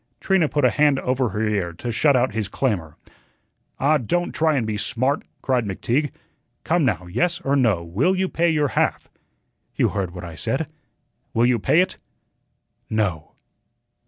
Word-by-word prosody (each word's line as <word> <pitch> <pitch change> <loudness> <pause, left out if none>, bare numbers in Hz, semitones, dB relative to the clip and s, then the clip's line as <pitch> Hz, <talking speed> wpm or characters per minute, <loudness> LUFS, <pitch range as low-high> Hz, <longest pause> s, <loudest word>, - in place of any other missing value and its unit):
Trina 190 -6 +2
put 145 -3 +1
a 125 - +4
hand 145 0 +3
over 130 -1 0
her 105 +1 -1
ear 100 -5 -1
to 120 +8 -5
shut 140 +5 +3
out 125 -3 +2
his 110 -2 -2
clamor. 100 - -2 0.8
"Ah, 150 +3 +3
don't 175 +10 -1
try 160 -1 +2
and 125 -5 0
be 110 -1 -2
smart," 130 +6 0 0.2
cried 125 -3 +1
McTeague. 120 +8 -1 0.5
"Come, - - +2
now, 90 - 0
yes 165 - 0
or 135 +1 +1
no, 110 -11 +2
will 115 - +1
you 190 0 0
pay 170 -1 +1
your 150 -3 +1
half?" - - 0 0.7
"You - - +2
heard 95 -3 -2
what 90 - -7
I 85 -1 -7
said." 135 - -1 0.7
"Will 115 +1 +4
you 120 -1 +3
pay 160 - +4
it?" 185 - -2 0.9
"No." 95 -8 -1
125 Hz, 170 wpm, -22 LUFS, 105-150 Hz, 0.9 s, a